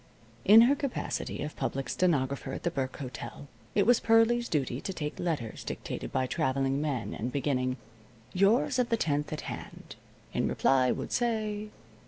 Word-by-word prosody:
In 215 +3 +9
her 255 +5 +5
capacity 275 - -3
of 150 - -5
public 135 -2 -2
stenographer 140 -5 0
at - - -6
the 175 - 0
Burke 130 -4 -3
Hotel, 140 +1 -7 0.3
it 200 - +4
was 245 0 +5
Pearlie's 230 +1 +3
duty 135 -3 -1
to - - -4
take 150 -4 -5
letters 150 -11 -3
dictated - - -5
by 130 - +1
traveling 135 +2 0
men 130 -9 -2
and 120 +3 -3
beginning: 130 -2 0 0.6
"Yours 225 +7 +3
of 245 - +1
the 230 - +2
10th 150 -5 0
at 155 - -3
hand. - - -8 0.4
In - - +1
reply 130 -2 +3
would - - -4
say. 215 -3 -1
150 Hz, 165 wpm, -29 LUFS, 135-215 Hz, 0.6 s, In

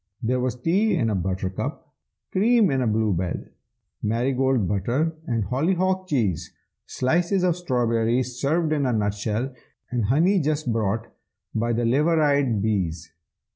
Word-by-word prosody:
There 125 +3 +1
was 125 -1 -1
tea 190 - +1
in 115 -9 +1
a - - 0
buttercup, 95 0 -3 0.4
cream 215 -1 +3
in 135 -1 +1
a 125 - +1
blue 110 -1 +1
bell, 90 -1 -1 0.6
Marigold 125 0 +1
butter 120 - 0
and 115 -3 0
hollyhock 185 - 0
cheese, 110 - -1 0.4
Slices 175 +8 +1
of 180 -2 +2
strawberry 120 -6 +1
served 145 +6 0
in 145 -3 +1
a 125 - +1
nutshell, 105 +4 -1 0.4
And 120 -4 0
honey 165 - +3
just 150 -5 0
brought 110 0 -1 0.5
by 115 +1 0
the 120 +1 0
liveried 140 -4 +2
bees. 85 -6 -1
125 Hz, 135 wpm, -24 LUFS, 110-155 Hz, 0.6 s, cream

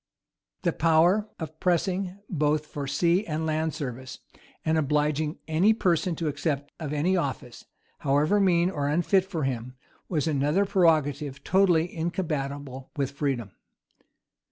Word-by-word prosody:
The 170 -3 +1
power 170 +6 +3
of 160 -1 -7
pressing, 185 +1 0
both 150 -3 0
for 145 -2 -6
sea 170 +7 +2
and 160 0 -2
land 155 0 -1
service, 130 -4 -6 0.5
and 160 - +2
obliging 150 +1 0
any 170 +8 +4
person 175 -3 +1
to 165 0 -3
accept 145 -1 -2
of 155 -4 -4
any 155 +6 +1
office, 135 -7 -3 0.3
however 150 +8 +2
mean 180 -2 +3
or 145 -5 -2
unfit 175 +5 +2
for 175 -6 -3
him, 125 -1 -3 0.3
was 155 -5 0
another 150 +6 +2
prerogative 150 -7 +1
totally 180 -3 +3
incompatible 145 -6 -3
with 140 -1 -1
freedom. 135 -7 -2
155 Hz, 130 wpm, -26 LUFS, 145-175 Hz, 0.5 s, any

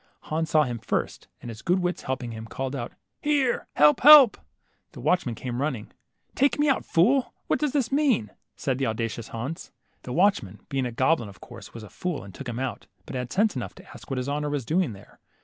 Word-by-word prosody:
Hans 160 +1 -2
saw 155 -1 +4
him 120 -4 -4
first, - - -3 0.2
and 120 - -7
his 110 +1 -10
good 180 +2 +2
wits 180 -1 -1
helping 130 -2 -4
him, 110 0 -8
called 135 +3 -4
out, 120 -3 -5 0.3
Here! 285 -4 +1
help, 150 0 +5
help! 290 -4 +10 0.3
" - - -45
The - - -10
watchman 155 -10 +1
came 125 +2 -4
running. 135 -8 -3 0.2
'' - - -48
Take 280 +2 +2
me 295 +1 +2
out, 275 - +2
fool; 245 +11 +2
what - - 0
does 300 -2 0
this 275 -4 0
mean? 270 - +2
" - - -55
said 130 -2 -2
the 135 - +1
auda 115 +1 -1
cious 115 0 -7
Hans. 130 +8 -6 0.3
The 125 - -8
watchman, 125 - +1
being 135 -2 -1
a - - -5
goblin, 130 -1 +1
of 95 -3 -15
course - - -12
was 115 - -8
a 105 - -11
fool 180 -4 -3
arid 95 0 -11
took 130 +5 -7
him 120 - -5
out, 130 -5 -4 0.2
but - - -8
had 125 -1 -4
sense 210 +2 +2
enough - - -5
to 190 +1 -15
ask - - -13
what 135 - -2
his 125 +1 -2
honor 150 +1 -1
was 145 -4 -2
doing 165 - 0
there. 100 0 -16
135 Hz, 235 wpm, -26 LUFS, 120-185 Hz, 0.3 s, help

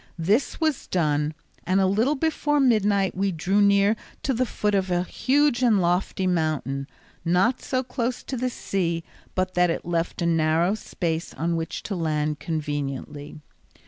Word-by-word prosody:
This 200 +11 +1
was 315 -5 0
done, 150 -3 0 0.3
and 185 +2 +2
a 190 - +4
little 220 +10 +2
before 295 0 +1
midnight 205 -7 +3
we 195 +1 0
drew 185 +5 +1
near 200 +1 +4 0.3
to 270 - +1
the 250 +1 0
foot 210 -1 -1
of 190 -1 +1
a 175 0 +1
huge 270 +5 +1
and 230 -5 +4
lofty 180 +2 0
mountain, 155 -6 -1 0.4
not 180 +9 +2
so 255 -1 -1
close 250 -1 -3
to 265 - -4
the 255 +1 -1
sea 170 -8 -2 0.3
but 185 0 0
that 180 0 +3
it 165 - -2
left 170 +1 -1
a - - +1
narrow 165 +2 +2
space 170 -6 -3
on 170 +2 -1
which 165 0 -4
to 210 - -4
land 150 -3 -1
conveniently. 145 -1 -4
185 Hz, 165 wpm, -25 LUFS, 165-225 Hz, 0.4 s, a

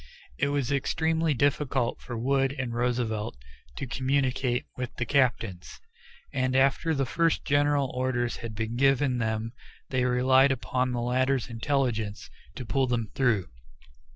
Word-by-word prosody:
It - - +2
was 140 -2 -1
extremely 160 +2 +1
difficult 140 -2 0
for 120 -2 -6
Wood 135 +3 +1
and 125 -3 -3
Roosevelt 115 - -1 0.4
to - - -4
communicate 130 -1 0
with 125 -1 -5
the 120 - -2
captains, 115 -9 0 0.5
and 130 -1 0
after 140 +4 +3
the 135 -1 +1
first 165 +5 +1
general 145 -2 +2
orders 125 -1 -1
had 115 -2 -7
been 115 +2 -3
given 135 -1 +3
them 110 0 -2 0.4
they 130 -1 +1
relied 130 +2 +4
upon 130 0 -1
the 120 -1 -2
latter's 130 +1 0
intelligence 115 -4 -1 0.2
to 125 - -6
pull 135 +2 +1
them 115 -4 -1
through. 115 - +1
130 Hz, 140 wpm, -27 LUFS, 120-135 Hz, 0.5 s, relied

